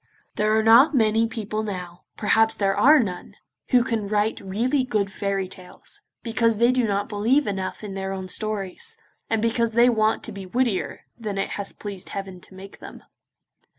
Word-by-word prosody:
There 215 +1 +2
are 220 - +2
not 240 +8 +6
many 225 -1 +3
people 215 -1 -4
now, 180 -5 -6
perhaps 220 +1 +3
there 195 -1 +1
are 300 +3 +6
none, 185 -7 -4 0.3
who 250 -2 +5
can 225 -4 -2
write 210 +1 0
really 235 +8 0
good 210 -5 -1
fairy 195 -1 -2
tales, 185 -1 -7 0.2
because 230 -1 +1
they 235 +3 +4
do 250 -2 +1
not 200 0 -1
believe 230 +7 +2
enough 190 0 -4
in 205 -2 -6
their 190 0 -4
own 190 -1 -5
stories, 215 - -2 0.3
and 225 -1 0
because 230 0 +1
they 240 +2 +5
want 220 -2 +1
to - - -7
be 195 -2 -8
wittier 235 -1 -1 0.2
than 210 -3 -4
it 195 - -1
has 200 -1 -4
pleased 200 -3 -7
Heaven 195 -2 -6
to 190 - -11
make 195 +1 -11
them. - - -11
215 Hz, 185 wpm, -24 LUFS, 195-230 Hz, 0.3 s, not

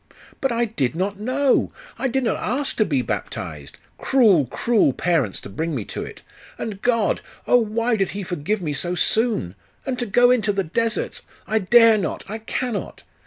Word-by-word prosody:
'But 270 - 0
I 235 0 +1
did 155 - -2
not 195 +3 -2
know! 260 +5 +1 0.3
I 270 - +1
did 265 +1 0
not 230 - +1
ask 275 +3 -2
to 215 - +3
be 140 -8 0
baptized! 75 -10 -5 0.2
Cruel, 205 - +4
cruel 210 - +2
parents, 155 - 0
to - - -9
bring 160 +10 -3
me 110 -6 -3
to - - -5
it! - - -10 0.3
And 205 -3 -5
God! 230 -4 +1 0.2
Oh, 245 - +5
why 230 +1 0
did 195 -2 0
He 200 - -3
forgive 180 +3 -2
me 150 -3 -2
so 175 +5 -1
soon? 215 - +1 0.3
And 255 -2 -2
to 240 - -1
go 245 +4 +5
into 220 -4 +2
the 195 -1 -1
deserts! 225 +7 -2 0.2
I 220 - +1
dare 225 +2 +6
not! 190 - -3
I 220 +3 -5
cannot! 225 0 -4
215 Hz, 185 wpm, -22 LUFS, 175-240 Hz, 0.3 s, dare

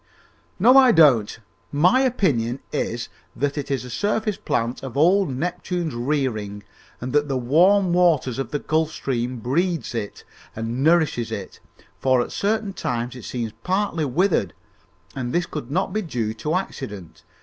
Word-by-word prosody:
"No, 245 +8 +6
I 260 -2 +7
don't. 135 - +4 0.3
My 175 - +4
opinion 140 - +1
is - - -2 0.3
that 145 0 -1
it 145 -2 -4
is 135 -3 -2
a - - -8
surface 210 - 0
plant 120 -7 -2
of 135 -1 -7
old 185 +5 +4
Neptune's 170 +3 -3
rearing 120 -6 -2 0.4
and 125 +1 -5
that 145 0 +2
the 135 -2 -1
warm 175 +9 +4
water 170 -7 +3
of 125 - -5
the 145 - -1
Gulf 155 +2 0
Stream 125 -4 -3
breeds 160 - -1
it 110 -3 -5 0.3
and 115 +4 -3
nourishes 155 -7 +2
it, - - -6 0.4
for 130 -1 +3
at 120 - -2
certain 210 0 -1
times 120 -5 -3
it 125 - -9
seems 115 -3 -4
partly 185 -4 0
withered, 140 - +1 0.6
and 125 -2 -3
this 175 0 +1
could 145 -5 -6
not 185 +7 -1
be 215 - 0
due 120 - -3
to 150 +9 -2
accident. 105 - -5
145 Hz, 160 wpm, -23 LUFS, 120-180 Hz, 0.6 s, I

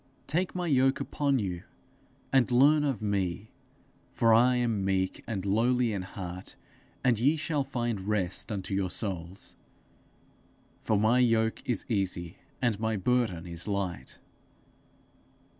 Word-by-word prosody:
Take 180 +5 -1
my 180 -1 -2
yoke 135 -4 +3
upon 140 -2 0
you, 90 -6 -3 0.7
and 130 -3 +4
learn 145 +5 +5
of 135 -7 -1
me, 100 0 -2 0.6
for 115 -2 +3
I 125 +3 +5
am 115 -5 0
meek 95 -1 -1
and 100 -4 -3
lowly 115 +3 +2
in 100 - -2
heart; 95 -1 -8 0.5
and 120 -4 +3
ye 140 +7 +3
shall 150 -2 -1
find 120 -6 -2
rest 100 -1 -1
unto 100 0 -4
your 95 -1 0
souls. 95 -2 -5 1.3
For 110 - +1
my 110 +4 +3
yoke 115 -2 +2
is 120 - 0
easy, 95 -5 -2 0.3
and 115 -5 +1
my 110 -1 0
burden 105 -5 0
is 85 +1 -6
light.' 100 -3 -3
110 Hz, 135 wpm, -29 LUFS, 95-125 Hz, 1.3 s, learn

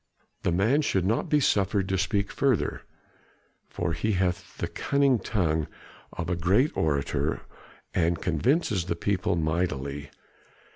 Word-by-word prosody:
The - - 0
man 110 - +3
should 95 - 0
not 110 +4 0
be 150 - +4
suffered 100 -6 +2
to 95 - +1
speak 100 +2 0
further, 135 -6 0 0.9
for 85 -1 -2
he 110 +7 0
hath 90 -1 -1
the - - -2
cunning 140 -3 +2
tongue 80 -8 0 0.5
of 85 - -4
a 90 - 0
great 95 - +2
orator, 70 -3 0 0.5
and 85 -1 +1
convinces 100 - +1
the 85 - -1
people 95 +2 0
mightily. 75 -4 -2
90 Hz, 135 wpm, -27 LUFS, 85-105 Hz, 0.9 s, be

